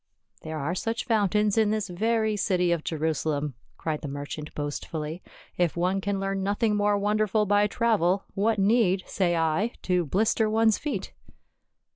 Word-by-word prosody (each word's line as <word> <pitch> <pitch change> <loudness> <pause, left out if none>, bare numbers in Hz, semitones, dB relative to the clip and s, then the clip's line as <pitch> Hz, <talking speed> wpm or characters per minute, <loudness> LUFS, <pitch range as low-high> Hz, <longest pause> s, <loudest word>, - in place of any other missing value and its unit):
" - - -36
There 160 0 -5
are 150 +4 -2
such 225 +5 -2
fountains 210 -2 +2
in 215 -2 +3
this 215 -1 -1
very 220 +3 0
city 180 -3 +1
of 170 -2 0
Jerusa 160 -1 -1
lem," 145 -1 -1 0.2
cried 155 -2 -3
the 150 - -5
merchant 145 +2 -6
boastfully; 150 +3 -4 0.2
" - - -25
if 170 -1 -1
one 185 +3 +1
can 200 0 -1
learn 195 0 -2
nothing 205 +2 +1
more 205 0 +2
wonderful 210 +1 +1
by 205 +1 +3
travel, 200 -4 +1
what 215 +2 +1
need, 195 -2 +3
say 175 -3 0
I, 165 +8 +1
to 180 -1 +1
blister 215 +5 +2
one's 220 0 +3
feet." 260 -11 -4
195 Hz, 170 wpm, -26 LUFS, 170-215 Hz, 0.2 s, in